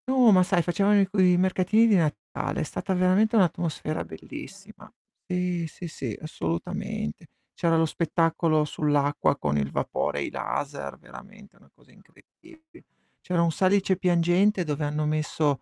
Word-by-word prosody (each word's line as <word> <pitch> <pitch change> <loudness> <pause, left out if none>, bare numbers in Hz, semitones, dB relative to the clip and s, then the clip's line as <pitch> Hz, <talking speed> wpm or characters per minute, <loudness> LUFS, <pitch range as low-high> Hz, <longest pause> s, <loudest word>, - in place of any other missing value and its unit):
No, 255 -3 +5
ma 185 -2 +6
sai 180 -1 +1
facevano 200 +4 +2
i 195 - +3
quei 185 -2 +3
mercatini 190 +4 +3
di 215 - +4
Natale, 150 - -2
è - - 0
stata 190 - -3
veramente 185 +5 +2
un'atmosfera 170 -5 0
bellissima. 215 -9 -11 0.4
Sì, 180 -2 -1
sì, 175 +3 -9
sì, 160 - -6
assolutamente. 85 - -4 0.3
C'era 165 -1 +1
lo 165 - +3
spettacolo 165 -1 +1
sull'acqua 145 -1 0
con 75 - -1
il 70 -1 -1
vapore - - -2
e - - -1
i - - -4
laser, 145 0 -4
veramente - - -15
una - - -24
cosa - - -25
incredibile. 320 -1 -21 0.4
C'era 180 -2 0
un 170 - +2
salice 190 +2 +2
piangente, 180 +2 +2
dove 150 -2 -3
hanno 150 +1 -1
messo 150 -2 0
175 Hz, 150 wpm, -26 LUFS, 155-195 Hz, 0.4 s, ma